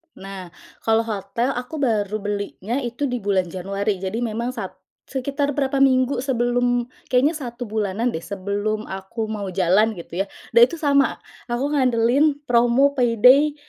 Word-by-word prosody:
Nah, 195 Hz, -1 st, -8 dB, 0.4 s
kalau 225 Hz, 0 st, +3 dB
hotel 230 Hz, +4 st, -2 dB
aku 250 Hz, +5 st, -8 dB
baru 215 Hz, -5 st, 0 dB
belinya 205 Hz, +3 st, -3 dB
itu 245 Hz, +1 st, -4 dB
di 250 Hz, 0 st, -2 dB
bulan 195 Hz, -4 st, 0 dB
Januari, 195 Hz, +2 st, -2 dB
jadi 190 Hz, +3 st, -3 dB
memang 235 Hz, +2 st, -2 dB
sat -, -, -5 dB, 0.4 s
sekitar 280 Hz, +2 st, -2 dB
berapa 275 Hz, -1 st, 0 dB
minggu 260 Hz, -1 st, +3 dB
sebelum, 245 Hz, -1 st, +1 dB, 0.3 s
kayaknya 260 Hz, +5 st, +4 dB
1 245 Hz, -4 st, -6 dB
bulanan 220 Hz, +1 st, -1 dB
deh 160 Hz, -, -4 dB
sebelum 205 Hz, +2 st, -3 dB
aku 195 Hz, +4 st, -5 dB
mau 205 Hz, -2 st, -4 dB
jalan 190 Hz, +4 st, +3 dB
gitu 175 Hz, +1 st, -4 dB
ya, -, -, -12 dB, 0.3 s
dan 470 Hz, -, +5 dB
itu 340 Hz, -, -7 dB
sama, 280 Hz, -4 st, +3 dB, 0.3 s
aku 240 Hz, +1 st, -2 dB
ngandelin 260 Hz, +2 st, +3 dB
promo 245 Hz, +3 st, +3 dB
payday, 260 Hz, +3 st, +4 dB
235 Hz, 150 wpm, -22 LUFS, 205-260 Hz, 0.4 s, dan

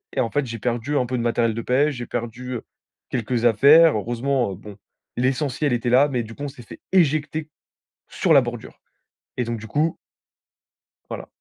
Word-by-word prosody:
et -, -, -1 dB
en 115 Hz, -, +1 dB
fait, 145 Hz, -1 st, 0 dB
j'ai 115 Hz, -1 st, -6 dB
perdu 120 Hz, +5 st, -1 dB
un 125 Hz, -, +1 dB
peu 130 Hz, +1 st, -3 dB
de -, -, -1 dB
matériel 115 Hz, -1 st, +1 dB
de 115 Hz, -, -4 dB
pêche, 140 Hz, +5 st, +1 dB
j'ai 120 Hz, -1 st, -5 dB
perdu 120 Hz, +1 st, -4 dB, 0.5 s
quelques 120 Hz, 0 st, -1 dB
affaires. 145 Hz, +8 st, +6 dB
Heureusement, 120 Hz, +2 st, -1 dB
heu, -, -, -6 dB
bon, 105 Hz, +2 st, -11 dB, 0.4 s
l'essentiel 135 Hz, +3 st, 0 dB
était 120 Hz, 0 st, -1 dB
là. 135 Hz, +4 st, +5 dB
Mais 125 Hz, -4 st, -1 dB
du 110 Hz, -, -10 dB
coup 140 Hz, -, -8 dB
on -, -, -2 dB
s'est 125 Hz, -3 st, -13 dB
fait -, -, -12 dB
éjecter 155 Hz, -3 st, +1 dB, 0.6 s
sur -, -, +1 dB
la -, -, +7 dB
bordure! -, -, -7 dB, 0.6 s
Et 125 Hz, -, +1 dB
donc 115 Hz, 0 st, -3 dB
du 110 Hz, -, -8 dB
coup 155 Hz, +5 st, 0 dB, 1.1 s
Voilà. -, -, -6 dB
125 Hz, 190 wpm, -23 LUFS, 115-145 Hz, 1.1 s, la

